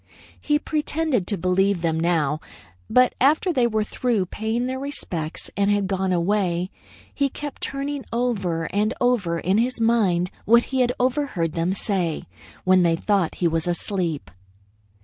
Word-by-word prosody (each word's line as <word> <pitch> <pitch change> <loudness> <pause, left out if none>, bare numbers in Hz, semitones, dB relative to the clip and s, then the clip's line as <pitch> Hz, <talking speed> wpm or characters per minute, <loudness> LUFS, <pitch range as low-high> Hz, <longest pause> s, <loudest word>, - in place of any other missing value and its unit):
He 295 -1 +2
pretended 300 - -1
to 205 - 0
believe 185 +1 +1
them 160 -1 +1
now, 160 -3 +1 0.5
but 250 0 +4
after 310 +7 +3
they 250 -5 +3
were 220 -2 0
through 220 -2 0
paying 220 +6 -2
their 260 +1 -3
respects 180 - -4
and 200 +1 +2
had 205 -1 +2
gone 190 -1 -1
away, 180 0 0 0.4
he 280 -1 +1
kept 290 +1 -7
turning 280 0 -3
over 200 -9 -1
and 210 +3 +1
over 220 -9 +1
in 190 +5 +1
his 250 +1 0
mind 200 -6 +2
what 235 +3 +6
he 265 -1 -1
had 245 -1 +3
overheard 250 - 0
them 170 +2 0
say 185 -5 -1 0.4
when 185 0 +5
they 170 -1 +3
thought 195 -1 0
he 175 - +1
was 165 0 -1
asleep. 170 - -2
200 Hz, 155 wpm, -23 LUFS, 175-250 Hz, 0.5 s, what